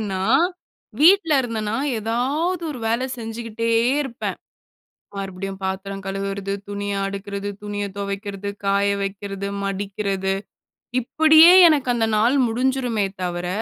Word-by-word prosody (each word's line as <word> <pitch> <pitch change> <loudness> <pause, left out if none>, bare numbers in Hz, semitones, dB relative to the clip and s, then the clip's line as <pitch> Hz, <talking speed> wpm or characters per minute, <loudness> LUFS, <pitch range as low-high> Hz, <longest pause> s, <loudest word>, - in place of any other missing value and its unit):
ஏன்னா, 195 -3 -3 0.8
வீட்ல 335 0 +6
இருந்தேன்னா 225 -3 -3 0.2
எதாவது 275 - -1
ஒரு 275 - -6
வேல 230 +3 0
செஞ்சுகிட்டே 230 0 -4 0.3
இருப்பேன். 270 -2 -5 0.8
மறுபடியும் 195 0 -5
பாத்திரம் 195 +1 -4
கழுவுறது, 195 0 -3 0.2
துணிய 205 0 -3
அடுக்றது, 200 0 -5
துணிய 205 0 -3
துவைக்றது, 200 0 -4 0.2
காய 200 0 +2
வைக்குறது, 195 0 -4 0.2
மடிக்றது. 195 0 -2 0.7
இப்டியே 315 +6 +6
எனக்கு 290 -5 +2
அந்த 230 -2 +1
நாள் 235 +5 +3
முடிஞ்சுருமே 245 -2 0 0.2
தவர, 175 0 -3
205 Hz, 105 wpm, -22 LUFS, 195-240 Hz, 0.8 s, வீட்ல